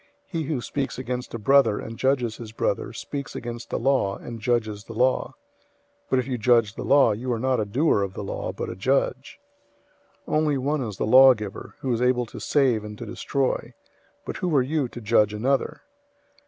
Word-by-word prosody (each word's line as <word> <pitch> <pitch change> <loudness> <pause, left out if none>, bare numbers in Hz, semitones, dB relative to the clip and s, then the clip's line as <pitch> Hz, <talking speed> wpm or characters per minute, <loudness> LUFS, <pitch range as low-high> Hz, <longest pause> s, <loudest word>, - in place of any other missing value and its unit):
He 165 -4 -3
who 140 -4 -2
speaks 135 +3 -3
against 125 -1 -4
a - - -2
brother 135 -1 +4
and 115 - -7
judges 125 -3 0
his 115 -2 -9
brother, - - -1
speaks 140 -3 -6
against 120 0 -6
the - - -1
law 125 -6 +1
and 115 -1 -8
judges 110 -3 -1
the 115 - -9
law. 125 +3 +1 0.7
But 130 - +2
if 130 - +1
you 125 -2 -3
judge 115 -2 +3
the - - -7
law, 140 -5 +5
you 120 +5 -3
are 120 - 0
not 130 0 +1
a 110 - 0
doer 125 +2 +2
of 95 -1 -3
the - - -5
law, - - -4
but - - -5
a - - -6
judge. 130 +5 -1 0.9
004:012 - - -1
Only 150 -2 +2
one 140 +3 -1
is 110 -6 -5
the - - -1
lawgiver, 120 -4 +4
who 130 -2 0
is 115 - -1
able 125 -1 +2
to - - -10
save 130 -7 +2
and 105 0 -8
to 120 - -7
destroy. 135 +4 -2 0.5
But - - -5
who 175 -4 -1
are 135 - +5
you 145 0 -1
to 120 - -10
judge 105 -1 +3
another? 130 +5 0
125 Hz, 205 wpm, -25 LUFS, 110-135 Hz, 0.9 s, law